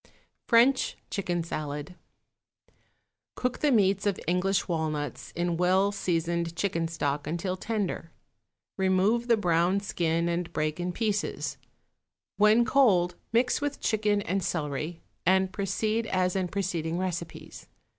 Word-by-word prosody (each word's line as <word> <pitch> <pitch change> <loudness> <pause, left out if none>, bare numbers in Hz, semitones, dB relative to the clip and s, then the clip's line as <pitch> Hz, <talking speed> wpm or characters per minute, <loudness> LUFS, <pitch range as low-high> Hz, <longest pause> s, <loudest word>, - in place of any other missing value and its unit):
=French 250 +3 +4
Chicken 175 -4 -1
Salad.= 150 0 -5 1.4
Cook 250 0 -2
the 295 - +2
meats 200 -3 +3
of 200 - 0
English 185 +3 +1
walnuts 155 -3 -3
in 175 0 0
well 185 +3 +3
seasoned 170 -3 -1
chicken 170 -3 0
stock 145 -3 -2
until 175 +4 -2
tender; 200 -4 -3 0.7
remove 190 +5 +2
the 230 -2 +4
brown 175 0 +2
skin 170 -4 0
and 170 0 -2
break 155 +2 -1
in 175 +1 -1
pieces; 210 +1 -2 0.8
when 215 +3 +5
cold 195 -10 +4 0.2
mix 240 +4 +2
with 290 -1 -2
chicken 210 -2 +1
and 195 +2 -1
celery, 155 0 -3 0.2
and 190 +1 +3
proceed 215 +3 -1
as 185 -1 +1
in 185 -2 0
preceding 170 -4 -2
recipes. 175 -2 -5
185 Hz, 125 wpm, -28 LUFS, 170-205 Hz, 1.4 s, when